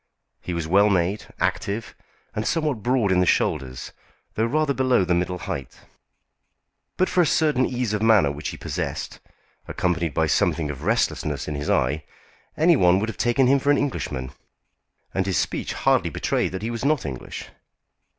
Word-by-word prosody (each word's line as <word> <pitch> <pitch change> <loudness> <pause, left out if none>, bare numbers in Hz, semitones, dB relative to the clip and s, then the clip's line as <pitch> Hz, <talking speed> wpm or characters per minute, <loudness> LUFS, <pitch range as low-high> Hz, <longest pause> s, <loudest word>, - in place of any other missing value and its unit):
He 90 - -4
was 85 -2 -3
well 100 +5 +5
made, 95 +1 0
active, 105 +3 -2 0.4
and 105 - -2
somewhat 150 -8 0
broad 120 -3 +1
in 90 - +3
the 90 - +2
shoulders, 65 -4 0 0.4
though 110 +1 0
rather 150 +2 +1
below 130 -7 +2
the 90 - +1
middle 90 +1 0
height. 70 -6 -6 1.2
But 185 - +3
for 180 - +2
a - - +4
certain 150 -6 +2
ease 125 -4 -2
of 105 - -1
manner 105 -10 +4
which 75 +2 -5
he - - -7
possessed, - - -4 0.5
accompanied 85 -4 -1
by - - +3
something 80 -3 +1
of 70 -1 -9
restlessness 95 -9 0
in 75 - -3
his 75 0 -4
eye, 70 +5 +1 0.5
any 170 +2 +5
one 90 -7 +4
would 110 +3 -2
have 110 - -7
taken 120 +2 +3
him 135 +2 +4
for 140 - -1
an 145 - +5
Englishman. 70 - -3 0.8
And 95 0 0
his 95 - +1
speech - - -2
hardly - - +2
betrayed - - -1
that 95 +2 -5
he 115 - -2
was 115 0 -5
not 145 -1 +1
English. 65 -4 -6
100 Hz, 180 wpm, -24 LUFS, 85-130 Hz, 1.2 s, well